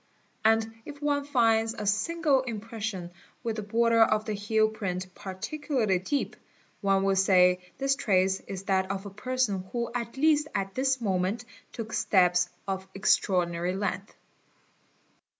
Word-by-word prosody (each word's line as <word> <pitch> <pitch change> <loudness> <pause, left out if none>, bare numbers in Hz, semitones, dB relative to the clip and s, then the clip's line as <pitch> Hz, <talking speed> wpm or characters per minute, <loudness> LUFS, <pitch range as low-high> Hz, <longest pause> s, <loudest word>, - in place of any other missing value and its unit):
And 225 0 +3
if 290 +2 -10
one 285 -1 0
finds 225 -5 +2
a 210 - -5
single 275 +7 +2
impression 220 -6 -5 0.3
with 225 -2 -2
the - - -2
border 230 +2 +2
of 215 -1 +3
the 215 - -2
heel 215 +2 +2
print 185 -4 -4
particularly 215 - -2
deep, 275 +10 -2 0.5
one 195 -1 +2
will 195 0 +2
say 180 -1 +4 0.2
this 275 0 +1
trace 190 -5 +2
— - - -29
is 195 -1 -6
that 190 -1 +1
of 195 0 -3
a 200 - -7
person 215 -2 -1
who 235 -1 -2
at 235 +1 -4
least 300 +1 +3
at 195 0 -2
this 265 -1 0
moment 195 +3 -1 0.3
took 225 -1 -6
steps 180 -2 +3 0.2
of 190 0 -3
extra 195 0 +2
ordinary 175 0 0
length. 195 0 -3
210 Hz, 150 wpm, -28 LUFS, 190-235 Hz, 0.5 s, say